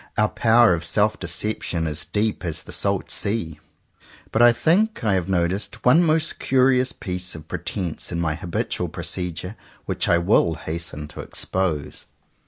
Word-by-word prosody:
Our 105 0 +3
power 115 -2 +4
of 85 -1 -2
self 105 +5 +1
deception 85 -1 -2
is 75 +1 -1
deep 105 0 -1
as 80 -3 -3
the - - -10
salt - - -1
sea. 85 -8 -1 0.7
But 110 - +2
I 120 0 +8
think 185 - +1
I 105 -3 +2
have 95 -1 -1
noticed 95 +2 -1
one 155 +7 +6
most 160 0 +1
curious 130 -1 +3
piece 90 -2 -4
of 80 0 -10
pretence 90 -2 -4
in 85 - -2
my 80 -2 0
habitual 85 +2 -3
procedure, 90 +2 -3 0.3
which - - -1
I 85 - +5
will 85 -2 +3
hasten 80 -1 -5
to - - -12
expose. 90 -6 -3
95 Hz, 160 wpm, -23 LUFS, 85-115 Hz, 0.7 s, I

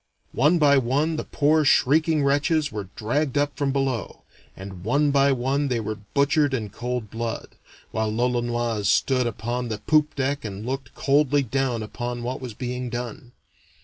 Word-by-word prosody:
One 150 +7 +4
by 140 -3 +5
one 140 +6 0
the - - -2
poor 155 +1 +2
shrieking 150 +3 +3
wretches 145 +2 +1
were 105 -3 -6
dragged 135 +6 -1
up 145 0 +1
from 140 -1 0
below, 135 -5 -2 0.3
and 95 -2 -9
one 140 +7 +2
by 140 0 +4
one 135 +3 0
they 125 -3 0
were 110 -1 -3 0.2
butchered 140 0 +3
in 110 -5 -4
cold 125 -2 -4
blood, 115 0 -4 0.4
while 110 0 -1
l'Olonoise 120 -2 0
stood 125 +2 +2
upon 120 +2 -3
the 110 -2 -3
poop 150 +7 +2
deck 140 +1 -1
and 105 0 -6
looked 130 -2 -5
coldly 145 0 +2
down 125 -2 -1
upon 120 +2 -5
what 125 +2 -4
was 125 -4 -7
being 125 +1 -4
done. 120 0 -6
125 Hz, 165 wpm, -24 LUFS, 115-145 Hz, 0.4 s, by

